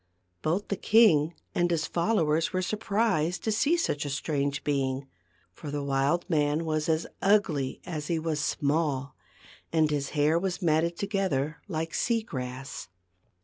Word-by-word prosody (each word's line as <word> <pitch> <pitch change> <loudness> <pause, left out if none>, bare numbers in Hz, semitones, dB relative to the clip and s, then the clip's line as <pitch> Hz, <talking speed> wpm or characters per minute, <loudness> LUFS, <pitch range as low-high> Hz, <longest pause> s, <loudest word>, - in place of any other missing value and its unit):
Both 180 +7 -1
the 200 - 0
king 170 -9 +4 0.2
and 175 0 +2
his 165 -2 0
followers 165 -4 +1
were 185 0 -1
surprised 200 -5 0
to 220 - 0
see 285 +10 +2
such 145 - -1
a 145 - -4
strange 140 0 -1
being; 135 -2 -1 0.5
for 145 - -8
the 145 0 -3
wild 140 +5 +1
man 150 -2 +1
was 155 0 -1
as 160 +1 +1 0.2
ugly 175 -10 +2
as 155 -5 -4
he 170 - 0
was 160 -1 -1
small, 145 -2 0 0.6
and 155 -2 +3
his 140 -2 -1
hair 150 +3 +3
was 185 0 -2
matted 170 0 +1
together 190 -8 -1
like 165 -3 -3
sea 230 -2 +1
grass. 130 - -6
160 Hz, 150 wpm, -28 LUFS, 145-180 Hz, 0.6 s, king